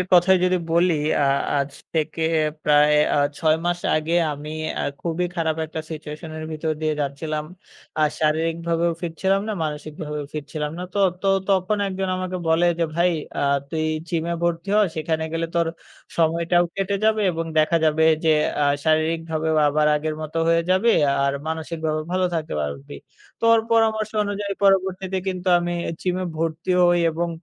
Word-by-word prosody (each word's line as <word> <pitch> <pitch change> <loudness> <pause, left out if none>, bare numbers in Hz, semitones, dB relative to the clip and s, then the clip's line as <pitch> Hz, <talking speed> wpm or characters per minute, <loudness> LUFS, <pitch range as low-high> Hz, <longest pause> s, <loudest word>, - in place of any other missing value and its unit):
এর 180 - -2
কথাই 180 +2 +6
যদি 185 0 +2 0.2
বলি 170 +1 +3 0.3
আ - - +3 0.3
আজ 140 0 -1 0.2
থেকে 160 +1 -1 0.4
প্রায় 150 0 +5 0.2
আ - - +3 0.2
৬ 155 -1 +3
মাস 175 0 0 0.2
আগে 155 +2 -1 0.2
আমি 145 +1 -7 0.3
আ - - -1 0.2
খুবই 170 +1 -1
খারাপ 160 -1 0
একটা 160 +1 -5
সিচুয়েসন 155 0 -7
এর 155 - -5
ভিতর 155 0 -2
দিয়ে 155 -1 +1
যাচ্ছিলাম। 150 +2 -3 0.6
আ - - +4 0.2
শারীরিকভাবেও 165 +2 +1
ফিট 170 -2 -4
ছিলাম 195 +1 +3
না, - - -1
মানসিকভাবেও 150 0 -5
ফিট 150 -2 -4
ছিলাম 150 -2 -2
না। - - -4
তো, - - -1 0.2
তো, 195 - +1 0.2
তখন 195 +2 +2
একজন 190 0 -3
আমাকে 185 0 -3
বলে 165 +2 +3
যে, 170 - +2
"ভাই 175 +1 +3 0.3
আ - - 0 0.3
তুই 160 -1 -1 0.2
জিম 165 -1 -1
এ - - 0
ভর্তি 170 +2 -1
হও। 210 - +5
সেখানে 160 0 -1
গেলে 165 0 -1
তোর 170 - +2 0.5
সময়টাও 170 +1 +2
কেটে 195 +1 0
যাবে 220 0 +3
এবং 165 0 -3
দেখা 155 +2 +3
যাবে 160 0 +3 0.2
যে 160 - +4 0.3
আ - - +4 0.2
শারীরিকভাবেও 160 0 0
আবার 150 +1 +2
আগের 155 +1 -2
মত 155 0 -7
হয়ে 165 0 +3
যাবি 190 +6 +4 0.3
আর 140 - +1 0.2
মানসিকভাবেও 160 -1 -3
ভালো 185 0 +1
থাকতে 160 -2 -3
পারবি।" 70 -1 -5 0.4
তো - - -2
ওর 225 - +4
পরামর্শ 220 -1 +2
অনুযায়ী 205 0 -3
পরবর্তীতে 190 -1 +2
কিন্তু 185 0 -3
আমি 175 0 -2 0.3
জিম 180 -1 -1
এ - - -2
ভর্তি 165 +2 -2
হই 175 0 +4
এবং 170 +2 -2
165 Hz, 175 wpm, -23 LUFS, 155-180 Hz, 0.6 s, কথাই